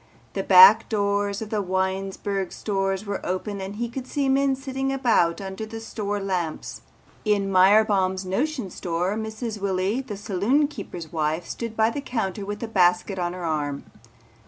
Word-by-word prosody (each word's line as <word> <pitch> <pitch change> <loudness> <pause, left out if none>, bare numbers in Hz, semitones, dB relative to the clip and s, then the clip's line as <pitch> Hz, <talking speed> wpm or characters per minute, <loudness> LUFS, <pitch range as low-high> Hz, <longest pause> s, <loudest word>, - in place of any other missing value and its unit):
The - - -1
back 465 +1 +8
doors 200 -1 0
of 215 - -10
the 215 -2 0
Winesburg 190 +1 -2
stores 195 -1 -2
were 200 -1 -4
open 195 +2 -3
and 195 +2 -6
he 235 +2 -2
could 255 +2 -7
see 280 -1 0
men 270 0 +3
sitting 270 0 -3
about 235 -11 +2
under 190 +1 -6
the 225 +1 -6
store 205 -2 -3
lamps. 180 -5 -3 0.4
In 200 -2 +1
Myerbaum's 190 -1 +4
Notion 245 - -2
Store 175 +3 -2
Mrs. 220 0 -5
Willy 195 +5 0
the 230 -7 -7
saloon 215 +8 +1
keeper's 175 - -8
wife 160 +1 -1
stood 230 -2 -6
by 220 +1 +3
the 285 - -4
counter 220 -7 -3
with 205 +2 -5
a - - -2
basket 185 -1 +2
on 175 0 -1
her 180 -1 -6
arm. 145 -3 -2
200 Hz, 165 wpm, -24 LUFS, 185-225 Hz, 0.4 s, back